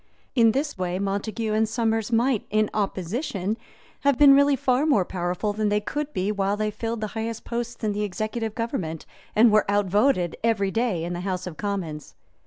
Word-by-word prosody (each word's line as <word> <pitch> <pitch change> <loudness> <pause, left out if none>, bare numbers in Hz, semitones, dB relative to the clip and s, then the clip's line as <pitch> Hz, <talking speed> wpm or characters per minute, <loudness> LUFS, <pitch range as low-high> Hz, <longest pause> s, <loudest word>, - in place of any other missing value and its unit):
In 230 -3 +5
this 280 -3 -2
way 180 0 -1
Montague 205 +3 -2
and 220 0 +2
Somers 225 -1 0
might, 235 0 +2
in 215 0 +1
opposition, 200 - -2 0.4
have 280 -3 +2
been 285 -2 +8
really 280 0 +5
far 260 +3 +1
more 210 - +3
powerful 180 +4 -2
than 215 0 0
they 210 0 +2
could 295 +7 -4
be 195 -5 -1
while 200 0 0
they 215 0 -1
filled 225 +1 -4
the 215 - -1
highest 225 0 -4
posts 235 0 -4
in 215 - +1
the 205 +1 -2
executive 215 +2 -3
government 195 - -3 0.3
and 225 +1 +6
were 215 -1 +3
outvoted 205 -1 +2
every 210 -4 +1
day 225 -7 0
in 175 +1 -3
the 175 - -4
House 185 -1 -3
of 180 -3 -6
Commons. 175 -6 -4
215 Hz, 190 wpm, -25 LUFS, 195-235 Hz, 0.4 s, been